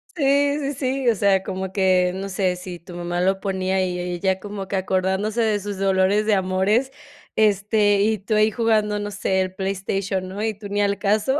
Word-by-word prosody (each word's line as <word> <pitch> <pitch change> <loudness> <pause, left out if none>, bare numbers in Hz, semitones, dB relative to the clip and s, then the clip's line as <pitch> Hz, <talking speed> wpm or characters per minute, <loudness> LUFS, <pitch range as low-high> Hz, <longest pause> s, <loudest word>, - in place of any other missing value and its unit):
Sí, 285 0 +2
sí, 280 0 -2
sí. 260 -1 0
O 225 - +3
sea, 195 -1 +2
como 190 -1 -4
que, 185 -2 +2
no 195 +1 -4
sé. 190 -1 0
Sí, 180 -1 -8
tu 175 +1 -12
mamá 175 0 -2
lo 190 +1 +1
ponía 190 -1 0
y 180 -1 -3
e 180 0 -3
ella 190 +2 0
como 200 -1 -6
que 200 - -3
acordándose 190 +4 0
de 215 -2 +1
sus 205 0 -5
dolores 195 +2 +2
de 215 - +2
amores. 190 +7 +1 0.4
Este, 205 -1 +3
y 215 +1 +2
tú 210 +3 -2
ahí 215 +1 +4
jugando, 215 -2 +1
no 205 0 -4
sé, 190 -1 -1
el 185 0 -2
PlayStation, 190 0 -2
¿no? 195 +3 -5
Y 220 -1 0
tú 205 -1 -8
ni 205 +1 0
al 200 0 +1
caso. 215 +7 +1
195 Hz, 210 wpm, -22 LUFS, 190-215 Hz, 0.4 s, ahí